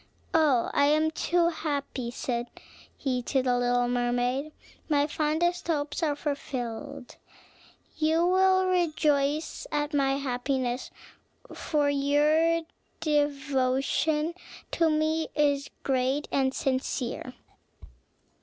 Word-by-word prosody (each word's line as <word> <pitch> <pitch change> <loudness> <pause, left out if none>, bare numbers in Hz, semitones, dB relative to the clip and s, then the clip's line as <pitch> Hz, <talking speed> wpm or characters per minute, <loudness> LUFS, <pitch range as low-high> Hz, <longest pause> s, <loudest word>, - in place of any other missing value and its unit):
"Oh, 295 -7 +3
I 285 - +4
am 310 +1 +3
too 340 +1 +1
happy," 285 -6 -3
said 240 0 -3 0.5
he 255 -3 -1
to 265 +2 0
the 250 -1 +2
little 245 0 +2
mermaid; 245 +4 0 0.4
"my 290 -1 +3
fondest 315 +4 0
hopes 295 -1 -1
are 320 - +2
all 290 - -1
fulfilled. 280 -2 -5 0.8
You 320 +2 +2
will 375 +1 +4
rejoice 305 -4 0
at 295 +1 -1
my 275 -2 +2
happiness; 255 -2 -2 0.6
for 295 -2 0
your 300 +4 +3 0.4
devotion 290 +1 0 0.4
to 330 -1 +2
me 315 +1 +1
is 285 -2 +1
great 265 +2 0
and 265 -1 +2
sincere." 260 -2 -2
290 Hz, 105 wpm, -27 LUFS, 260-310 Hz, 0.8 s, I